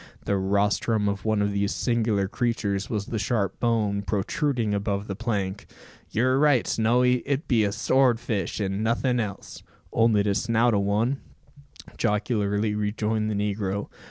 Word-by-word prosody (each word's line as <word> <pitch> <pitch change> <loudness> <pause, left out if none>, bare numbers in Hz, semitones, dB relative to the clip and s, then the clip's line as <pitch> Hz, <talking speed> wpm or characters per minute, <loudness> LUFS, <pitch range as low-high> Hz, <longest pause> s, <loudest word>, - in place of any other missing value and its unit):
The 100 - +1
rostrum 100 +2 +1
of 100 0 -2
one 110 -2 +2
of 100 - 0
these 100 0 -1
singular 110 -5 +1
creatures 100 -3 -1
was 105 -3 -2
the 110 - -3
sharp 105 -3 -1
bone 110 -4 +1
protruding 105 - -1
above 100 0 -1
the 100 - -5
plank. 100 -3 -3 0.4
"You're 130 +4 +2
right, 145 -5 +4
Snowy, 125 +3 +2
it 140 +1 -2
be 115 -5 +3
a 100 - +1
sword 125 +2 +2
fish, 105 -3 -3
and 100 +1 -1
nothing 120 +2 +1
else." 105 -4 -5 0.3
"Only 110 -2 +3
de 100 -1 +1
snout 115 +2 +2
o' 100 - +3
one," 110 +7 0 0.8
jocularly 105 0 0
rejoined 105 +1 -1
the 105 - -1
negro. 100 -1 -2
105 Hz, 155 wpm, -25 LUFS, 100-115 Hz, 0.8 s, right